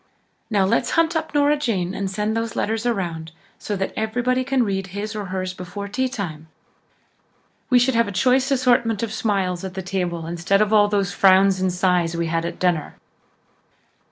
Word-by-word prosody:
"Now, 200 -4 +2
let's 190 - +1
hunt 330 0 +3
up 320 - -3
Nora 290 +1 +4
Jane 195 -10 -1
and 195 0 -3
send 210 +3 -2
the 225 - +1 0.2
letters 225 +2 -1
around 170 -8 -3 0.3
so 210 - -3
that 190 0 -3
everybody 245 +4 0
can 265 -1 +1
read 195 -3 -2
his 205 +3 -5
or 210 -1 -4
hers 185 0 -4
before 185 +3 -7
tea 260 +6 -1
time. 160 - -6 1.2
We 250 - +5
should 250 +2 +3
have 230 -1 +2
a - - -4
choice 255 +7 +2
assortment 240 -5 +2
of 220 -2 -3
smiles 190 -6 -1
at 190 -1 -6
the 190 - -4
table 180 -3 -3
instead 175 +4 0
of 215 0 +2
all 205 -1 +6
those 200 -3 0
frowns 190 0 +4
and 185 -1 +1
sighs 180 -2 +1
we 170 - 0
had 165 0 -1
at 170 - -5
dinner." 175 -5 0
200 Hz, 185 wpm, -22 LUFS, 180-230 Hz, 1.2 s, all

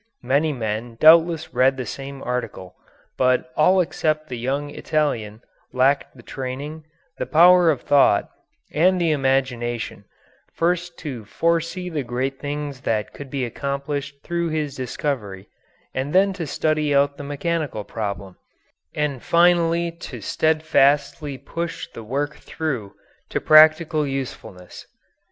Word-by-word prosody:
Many 140 +5 +2
men 115 -2 -4
doubtless 160 -1 +5
read 130 +2 +3
the 130 - -4
same 135 +4 -7
article, 125 -7 -4 0.4
but 125 0 +2
all 185 +5 +4
except 155 -2 -1
the 125 - -4
young 140 +4 -2
Italian 120 -10 -2 0.3
lacked 135 +2 +1
the 120 - -14
training, 140 +6 -6 0.3
the - - -2
power 175 +1 +6
of 140 -6 +1
thought, 145 -1 +4 0.5
and 180 +5 +3
the 170 -2 +2
imagination, 130 -4 -1 0.5
first 175 0 -1
to 125 -7 -5
foresee 165 - -1
the 160 -4 -2
great 130 +2 -3
things 145 -2 -5
that 110 -4 -2
could 140 -2 -9
be 135 -1 -2
accomplished 140 +3 -4
through 170 -1 -2
this 155 -3 -2
discovery, 120 -7 -4 0.5
and 135 +3 -3
then 195 +1 +4
to 175 -4 -5
study 155 0 0
out 140 0 +2
the 145 - -7
mechanical 145 -4 -2
problem, 100 -3 -5 0.6
and 145 -4 -1
finally 170 0 +3
to 165 -7 -9
steadfastly 145 +1 +1
push 170 +5 -5
the 115 - -8
work 145 +6 -3
through 130 -11 -4 0.3
to - - -1
practical 155 0 +5
usefulness. 130 -9 -7
145 Hz, 130 wpm, -22 LUFS, 130-160 Hz, 0.6 s, power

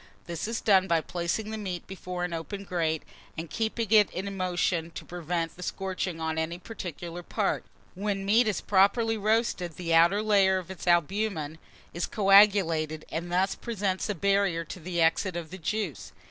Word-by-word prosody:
This 170 +3 -4
is 230 0 -2
done 190 -3 +4
by 170 -2 +3
placing 175 +6 -3
the 220 - -4
meat 185 -4 -4
before 180 -1 -5
an 180 -1 -2
open 195 +5 -5
grate, 165 -4 -1 0.3
and 165 0 -6
keeping 225 -1 -2
it 210 -3 +6
in 195 +2 -5
motion 175 -2 0
to - - -7
prevent 170 -1 -3
the 180 - -12
scorching 185 -2 -3
on 160 0 -1
any 165 +2 -2
particular 175 -3 -7
part. - - -1 0.3
When 195 0 -2
meat 220 +4 +4
is 210 - 0
properly 205 +4 +3
roasted, 215 -5 0
the 170 -2 -2
outer 170 +6 +5
layer 195 -3 +4
of 185 0 -6
its 185 - -9
albumen 175 -2 +1 0.3
is 170 - -2
coagulated, 195 -7 +4
and 175 +2 -4
thus 185 +2 +2
presents 205 -4 -2
a 210 - 0
barrier 195 -2 +1
to 165 - -8
the 175 +1 -3
exit 165 +3 +2
of 170 -2 -5
the 185 - -8
juice. 200 -2 -3
185 Hz, 175 wpm, -28 LUFS, 170-200 Hz, 0.3 s, it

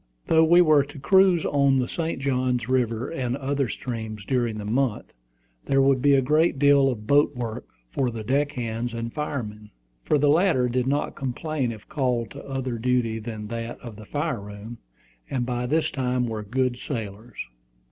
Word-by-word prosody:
Though 160 0 +4
we 170 +2 +6
were 155 -4 +5
to 145 +2 -12
cruise 185 +3 +4
on 140 -1 +3
the 125 -1 0
St. 165 -3 -3
Johns 125 -3 0
River 125 -1 0
and 130 -5 -2
other 140 -2 -1
streams 110 -5 -5
during 120 -3 0
the 105 - -6
month, 120 +1 -1 0.5
there 135 - +2
would 135 -1 +3
be 140 +1 +5
a 135 - +3
great 155 +3 +2
deal 140 -1 +5
of 110 -5 -4
boat 145 +3 +3
work 115 -3 -5 0.2
for 130 -2 0
the 115 -2 -6
deck 140 +5 0
hands 120 -1 -3
and 115 0 -4
firemen, 110 -8 -4 0.3
for 150 - +2
the 145 +1 +2
latter 155 -5 +3
did 125 +1 0
not 145 +2 0
complain 135 0 -2
if 110 -2 -11
called 125 -5 -1
to 140 - -9
other 130 -3 -3
duty 120 -2 0
than 110 -1 -6
that 115 0 -5
of 120 -3 -9
the 110 +1 -11
fire 145 -2 -2
room, 105 +3 -9 0.5
and 125 -3 -1
by 125 0 -2
this 160 +3 +1
time 125 -2 0
were 110 -2 -3
good 125 +4 -1
sailors. 110 -2 -6
125 Hz, 185 wpm, -25 LUFS, 115-140 Hz, 0.5 s, we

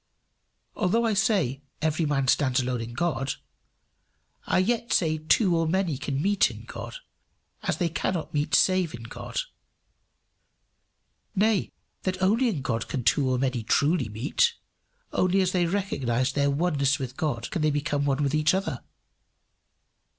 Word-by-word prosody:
Although 230 +6 +1
I 225 - +2
say, 190 - +1 0.2
every 155 +1 0
man 135 -2 0
stands 130 -1 +3
alone 125 -2 -1
in 115 +1 -6
God, 145 -4 -1 1.1
I - - +2
yet 230 +5 0
say 155 -3 +2
two 170 +4 +3
or 165 -1 +1
many 180 -2 0
can 135 -1 -2
meet 200 0 +3
in - - -10
God - - -8 0.7
as - - -1
they 175 - +1
cannot 165 +1 -2
meet 150 +1 +1
save 185 -6 +3
in 115 - -10
God; 115 - -4 1.9
nay, 210 0 +2 0.3
that 185 -1 -2
only 220 +7 +3
in 155 -11 -3
God 115 -3 -2
can 130 - -3
two 135 +2 +3
or 130 - +1
many 130 -2 0
truly 140 +3 +1
meet; 145 - +1 0.6
only 185 +1 +2
as 185 -1 +2
they 180 -2 +1
recognize 135 -10 -1
their 140 0 +2
oneness 140 -2 +1
with 130 -1 -5
God 130 -8 -2
can 175 - -2
they 155 - +3
become 145 0 -1
one 140 +1 +1
with 140 0 0
each 155 +3 +3
other. 195 +2 -3
155 Hz, 155 wpm, -26 LUFS, 135-185 Hz, 1.9 s, stands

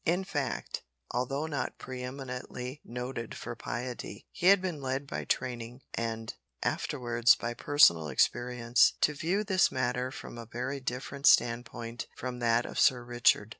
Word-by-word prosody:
In 175 +3 +1
fact, 145 -9 -3 0.3
although 135 +5 -1
not 150 -3 -3
pre 130 -1 -7
eminently 125 +1 -6
noted 125 -1 -5
for - - -6
piety, 125 0 -5
he 175 - 0
had 200 +1 +8
been 180 -6 -3
led 135 +1 -2
by - - -4
training, 125 0 -2
and 115 -1 -3 0.3
afterwards 120 -2 +3
by 120 +2 -3
personal 115 - +5
experience, 120 - +3
to 150 - +4
view 175 +8 0
this 190 -3 +3
matter 125 0 0
from 120 - -8
a 115 - -8
very 125 +4 -3
different 130 +2 -2
standpoint 115 0 +2
from 125 -1 -4
that 115 0 +2
of - - -4
Sir 125 -2 +4
Richard. 120 -3 +3
125 Hz, 150 wpm, -30 LUFS, 120-140 Hz, 0.3 s, had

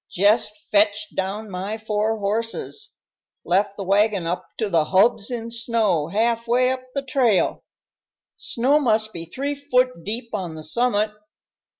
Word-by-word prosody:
Jest 210 +2 +2
fetched 210 0 +3
down 200 +3 -3
my 195 +4 -4
four 215 0 -1
horses 225 - -3 0.5
left 195 +3 +1
the 200 - -4
wagon 200 -1 +2
up 175 +2 -3
to 220 - 0
the 165 -5 +2
hubs 200 +5 +3
in 230 -2 -5
snow 230 -9 +1
half 230 +5 0
way 250 +2 +3
up 260 0 -3
the 275 - -1
trail 255 -7 +1 0.7
snow 265 +5 +1
must 220 -5 +1
be 165 -1 -6
three 275 - -3
foot 255 - 0
deep 230 +4 -4
on 180 -6 -3
the 155 - -8
summit. 215 +4 +1
215 Hz, 150 wpm, -23 LUFS, 200-235 Hz, 0.7 s, fetched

